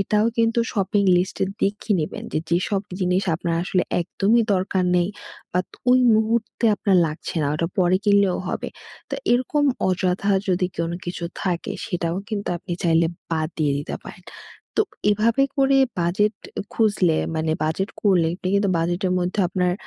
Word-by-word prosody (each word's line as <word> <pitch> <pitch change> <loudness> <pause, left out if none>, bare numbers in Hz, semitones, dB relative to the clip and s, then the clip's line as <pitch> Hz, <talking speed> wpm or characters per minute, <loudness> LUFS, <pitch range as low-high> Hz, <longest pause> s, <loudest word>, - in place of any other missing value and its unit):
এটাও 210 +2 +2
কিন্তু 230 0 +2
শপিং 200 -1 +1
লিস্টের 185 +1 0
দেখে 210 +2 -1
নিবেন 155 - -4
যে, 155 - +1
যেসব 185 +3 +1 0.2
জিনিস 180 +1 +1
আপনার 170 0 -2
আসলে 185 -1 +1 0.2
একদমই 205 +6 +2
দরকার 185 0 0
নেই, 175 0 +2 0.4
বাত 180 +1 -1 0.2
ঐ - - +7 0.2
মুহূর্তে 220 +2 0
আপনার 195 -2 +2
লাগছে 155 +1 -6
না, - - +1
ঐটা 165 +2 0
পরে 180 0 +4
কিনলেও 200 -3 +4
হবে। - - -3 0.4
তো - - -1 0.2
এইরকম 260 +4 +1 0.2
অযথা 185 +2 +1 0.2
যদি 180 0 +2
কোনো 170 +1 -2
কিছু 175 -1 -5 0.2
থাকে, 175 -3 -2
সেটাও 175 -4 -2
কিন্তু 210 -2 -3
আপনি 180 +1 -7
চাইলে 165 -1 +3 0.2
বাদ 160 -1 0
দিয়ে 150 -3 +2
দিতে 145 - -5
পারেন। - - -11 0.5
তো - - +4 0.3
এভাবে 225 +5 +2
করে 275 0 +4 0.2
বাজেট 205 +5 +1 0.4
খুঁজলে, 195 -7 +2 0.2
মানে 160 0 0
বাজেট 160 +6 -1
করলে 185 -5 +4
আপনি 185 0 -4
কিন্তু 200 -1 +2
বাজেটের 175 +3 0
মধ্যেও 180 +2 0
আপনার 180 -1 0
185 Hz, 155 wpm, -23 LUFS, 175-205 Hz, 0.5 s, ঐ